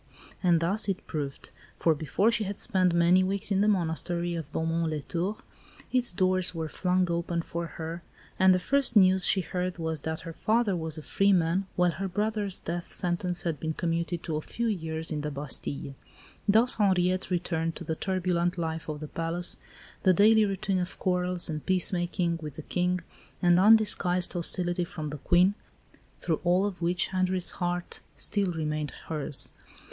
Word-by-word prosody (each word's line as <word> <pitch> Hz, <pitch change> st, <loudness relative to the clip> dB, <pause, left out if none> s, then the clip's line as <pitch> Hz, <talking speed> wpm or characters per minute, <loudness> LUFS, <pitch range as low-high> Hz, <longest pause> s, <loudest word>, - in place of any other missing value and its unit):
And 175 Hz, -3 st, +3 dB
thus 200 Hz, +5 st, +2 dB
it 190 Hz, -, -3 dB
proved; 145 Hz, -3 st, -5 dB, 0.3 s
for 165 Hz, -, +3 dB
before 160 Hz, +9 st, +1 dB
she 230 Hz, -2 st, 0 dB
had 200 Hz, +1 st, -5 dB
spent 185 Hz, -5 st, +3 dB
many 170 Hz, +2 st, +4 dB
weeks 200 Hz, +2 st, 0 dB
in 195 Hz, 0 st, +2 dB
the 210 Hz, -, +3 dB
Monastery 175 Hz, -2 st, -1 dB
of 160 Hz, -4 st, -5 dB
Beaumont 165 Hz, +1 st, -1 dB
les 150 Hz, -2 st, -3 dB
Tours, 185 Hz, +7 st, -3 dB, 0.5 s
its 250 Hz, -1 st, +2 dB
doors 185 Hz, 0 st, +1 dB
were 160 Hz, -1 st, -3 dB
flung 180 Hz, +3 st, 0 dB
open 170 Hz, 0 st, -2 dB
for 170 Hz, 0 st, -4 dB
her, 165 Hz, +1 st, -5 dB, 0.4 s
and 190 Hz, 0 st, +6 dB
the 185 Hz, -, +4 dB
first 265 Hz, +6 st, +2 dB
news 190 Hz, -2 st, +5 dB
she 190 Hz, -, +4 dB
heard 180 Hz, +1 st, -3 dB
was 160 Hz, -3 st, -3 dB
that 160 Hz, +1 st, -4 dB
her 165 Hz, -1 st, -8 dB
father 220 Hz, +1 st, +1 dB
was 160 Hz, -2 st, -1 dB
a 155 Hz, -, -7 dB
free 195 Hz, +5 st, +2 dB
man, 180 Hz, +1 st, +1 dB
while 180 Hz, -1 st, +3 dB
her 190 Hz, +5 st, -4 dB
brother's 205 Hz, 0 st, -1 dB
death 175 Hz, +1 st, -5 dB
sentence 175 Hz, -1 st, -2 dB
had 165 Hz, -4 st, -2 dB
been 160 Hz, 0 st, -2 dB
commuted 170 Hz, 0 st, -2 dB
to 155 Hz, -2 st, -2 dB
a -, -, -3 dB
few 235 Hz, +8 st, -4 dB
years 160 Hz, -6 st, -3 dB
in 150 Hz, -1 st, -2 dB
the 150 Hz, -, -3 dB
Bastille. 140 Hz, 0 st, -3 dB, 0.6 s
Thus 225 Hz, +5 st, +5 dB
Henriette 185 Hz, -3 st, +1 dB
returned 165 Hz, -2 st, -1 dB
to -, -, -7 dB
the 160 Hz, -, -2 dB
turbulent 180 Hz, -1 st, -1 dB
life 160 Hz, -1 st, -4 dB
of 150 Hz, 0 st, -5 dB
the 155 Hz, -, -5 dB
palace 165 Hz, +3 st, +1 dB, 0.4 s
the 185 Hz, -, +4 dB
daily 215 Hz, +3 st, +5 dB
routine 195 Hz, -1 st, -1 dB
of 180 Hz, 0 st, -4 dB
quarrels 180 Hz, -1 st, 0 dB
and 155 Hz, -2 st, -4 dB
peacemaking 175 Hz, -2 st, 0 dB
with 150 Hz, -3 st, -7 dB
the 155 Hz, -, -8 dB
King, 180 Hz, +1 st, -1 dB, 0.4 s
and 175 Hz, 0 st, +4 dB
undisguised 195 Hz, -4 st, +4 dB
hostility 175 Hz, 0 st, +1 dB
from 155 Hz, -3 st, -6 dB
the 145 Hz, 0 st, -7 dB
Queen, 180 Hz, +6 st, +3 dB, 0.7 s
through 160 Hz, -3 st, -1 dB
all 180 Hz, +2 st, +3 dB
of 195 Hz, -4 st, -5 dB
which 175 Hz, +1 st, +1 dB
Henri's 185 Hz, -1 st, +1 dB
heart 175 Hz, 0 st, -3 dB, 0.2 s
still 200 Hz, -3 st, 0 dB
remained 155 Hz, -2 st, -2 dB, 0.2 s
hers. 150 Hz, -3 st, -2 dB
175 Hz, 180 wpm, -28 LUFS, 165-190 Hz, 0.7 s, and